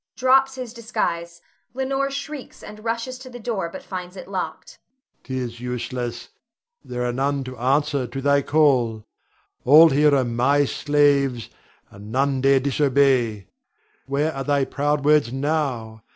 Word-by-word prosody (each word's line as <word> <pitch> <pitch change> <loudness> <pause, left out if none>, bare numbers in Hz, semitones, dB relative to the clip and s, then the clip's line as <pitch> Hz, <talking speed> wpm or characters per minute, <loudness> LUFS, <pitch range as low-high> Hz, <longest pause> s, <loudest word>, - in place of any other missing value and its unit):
[Drops 265 +1 +3
his 250 -3 -7
disguise. 170 -8 -3 0.3
Leonore 270 +1 -1
shrieks, 280 0 -7
and 210 0 -11
rushes 230 +3 -3
to 260 0 -11
the 245 - -9
door, 215 -7 -3
but - - -9
finds 180 0 -7
it - - -9
locked.] 185 -5 -6 0.4
'Tis 125 -2 -5
useless; 120 -1 -5 0.5
there 125 0 -4
are 120 - -1
none 140 +2 -1
to 130 0 -8
answer 140 +1 +1
to 120 +3 -6
thy 140 +1 +3
call. 130 -8 +2 0.6
All 155 +5 +8
here 145 +1 +4
are 130 -2 +2
my 130 +5 +2
slaves, 140 -4 +1 0.4
and 100 +2 -11
none 135 +1 +1
dare 135 0 +4
disobey. 130 -6 +1 0.6
Where 145 +3 0
are 135 - -4
thy 140 -1 +1
proud 145 +1 -1
words 150 -5 +4
now? 135 -6 -2
140 Hz, 145 wpm, -22 LUFS, 130-170 Hz, 0.6 s, All